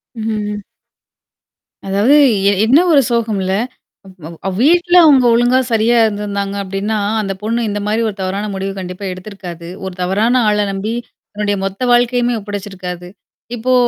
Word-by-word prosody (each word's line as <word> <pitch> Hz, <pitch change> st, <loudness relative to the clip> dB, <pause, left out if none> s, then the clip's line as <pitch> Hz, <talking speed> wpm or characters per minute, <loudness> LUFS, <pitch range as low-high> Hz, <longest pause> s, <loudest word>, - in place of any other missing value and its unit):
ம், 225 Hz, -, -6 dB
ம், 215 Hz, -1 st, -2 dB
ம். 205 Hz, -, -7 dB, 1.2 s
அதாவது 200 Hz, +7 st, +2 dB, 0.4 s
எ -, -, +4 dB
என்ன 260 Hz, +7 st, +5 dB
ஒரு 290 Hz, -3 st, +6 dB
சோகம் 230 Hz, -4 st, 0 dB
இல்ல. 190 Hz, 0 st, -1 dB, 0.5 s
அ, 185 Hz, -5 st, -12 dB, 0.2 s
அவ் 190 Hz, -, -2 dB
வீட்டுல 350 Hz, +4 st, +3 dB
அவுங்க 275 Hz, -5 st, +5 dB
ஒழுங்கா 245 Hz, +2 st, +3 dB
சரியா 225 Hz, +2 st, +3 dB
இருந்தாங்க 200 Hz, -2 st, -3 dB
அப்பிடின்னா 195 Hz, +3 st, -3 dB, 0.2 s
அந்தப் 195 Hz, -1 st, -5 dB
பொண்ணு 230 Hz, +3 st, -1 dB
இந்தமாரி 210 Hz, +2 st, -1 dB
ஒரு 205 Hz, -, -7 dB
தவறான 195 Hz, +3 st, -3 dB
முடிவு 195 Hz, 0 st, -3 dB
கண்டிப்பா 180 Hz, +2 st, -7 dB
எடுத்திருக்காது. 185 Hz, -3 st, -9 dB, 0.2 s
ஒரு 190 Hz, -, -5 dB
தவறான 215 Hz, +8 st, +2 dB
ஆள 210 Hz, 0 st, +1 dB
நம்பி 200 Hz, +3 st, -3 dB, 0.4 s
தன்னுடைய 205 Hz, -1 st, -1 dB
மொத்த 195 Hz, +4 st, -5 dB
வாழ்க்கையுமே 245 Hz, 0 st, +2 dB
ஒப்படச்சிருக்காது. 190 Hz, -3 st, -7 dB, 0.5 s
இப்போ 245 Hz, +2 st, 0 dB
210 Hz, 145 wpm, -16 LUFS, 195-230 Hz, 1.2 s, ஒரு